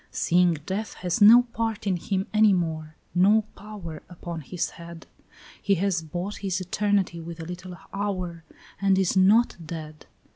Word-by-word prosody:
"Seeing 175 0 +2
death 205 +3 -4
has 175 +3 0
no 230 +4 +9
part 225 -2 -2
in 195 -2 +1
him 190 +2 -2
any 215 -1 +5
more, 160 -3 -2 0.2
no 205 +5 +4
power 195 -7 -9
Upon 170 -2 -7
his 170 +4 -3
head; 170 -1 -11 0.6
He 200 - +2
has 185 -1 0
bought 175 +6 -5
his 190 -2 -2
eternity 190 -1 0
with 165 0 -8
a 165 - -6
little 180 +1 -8 0.2
hour, 185 -4 -3 0.4
And 195 -1 +3
is 190 -1 +1
not 205 +6 +4
dead. 155 -1 -8
185 Hz, 155 wpm, -25 LUFS, 170-200 Hz, 0.6 s, no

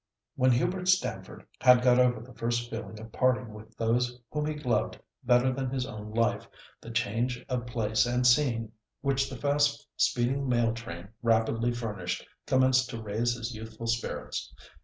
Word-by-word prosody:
When 130 0 +3
Hubert 180 +9 0
Stamford 185 0 0
had 125 -1 +6
got 125 0 +5
over 125 -3 +3
the 125 +2 -13
first 120 +1 -2
feeling 110 -1 -6
of 110 0 -10
parting 125 -3 +1
with 110 +1 -13
those 120 +2 0
whom 150 0 -1
he 155 - -2
loved 125 -7 -1 0.2
better 125 +1 +4
than 130 0 -2
his 130 -1 -2
own 105 -4 -8
life, 115 +1 0 0.3
the - - -10
change 120 +2 -1
of 125 -2 -2
place 115 0 +1
and 125 +1 +1
scene 120 -4 +3 0.3
which 135 -1 +1
the 130 - -7
fast 145 +2 +1
speeding 130 +3 +1
mail 120 -2 +2
train 100 -5 -8
rapidly 115 0 +2
furnished 115 -3 -4 0.2
commenced 130 -1 +3
to 115 - -5
raise 115 +3 -1
his 120 +1 -5
youthful 110 +1 -8
spirits. 115 +1 -3
120 Hz, 165 wpm, -29 LUFS, 115-130 Hz, 0.3 s, had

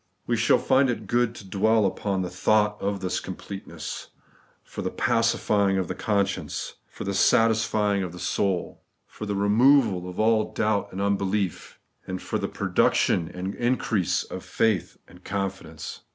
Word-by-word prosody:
Wo 120 - -1
shall 115 -1 +4
find 135 0 +3
it 115 -3 -3
good 120 +2 +1
to 100 -5 -11
dwell 110 +3 +2
upon 95 0 -1
the 90 - -3
thought 105 +3 +2
of 100 -1 -2
this 90 -1 -1
completeness, 95 +1 -7 0.6
for - - -7
the - - -1
pacifying 105 -4 +1
of 95 -2 -1
the 95 - -3
conscience, 100 +1 -1
for - - -8
the 100 - -2
satisfying 110 -2 +3
of 90 -2 -3
the 90 - -10
soul, 95 0 -1 0.2
for 105 - -8
the 100 - -1
removal 105 -2 +4
of 90 - -8
all 110 0 +2
doubt 110 -2 0
and 95 - -4
unbelief, 100 -2 -1 0.3
and 95 0 -4
for - - -3
the - - -2
pro - - -4
duction 85 -2 +2
and 95 +2 -4
increase 120 -6 0
of - - -8
faith 110 -4 0
and 90 +1 -17
confidence. 95 -5 -5
100 Hz, 165 wpm, -25 LUFS, 95-110 Hz, 0.6 s, shall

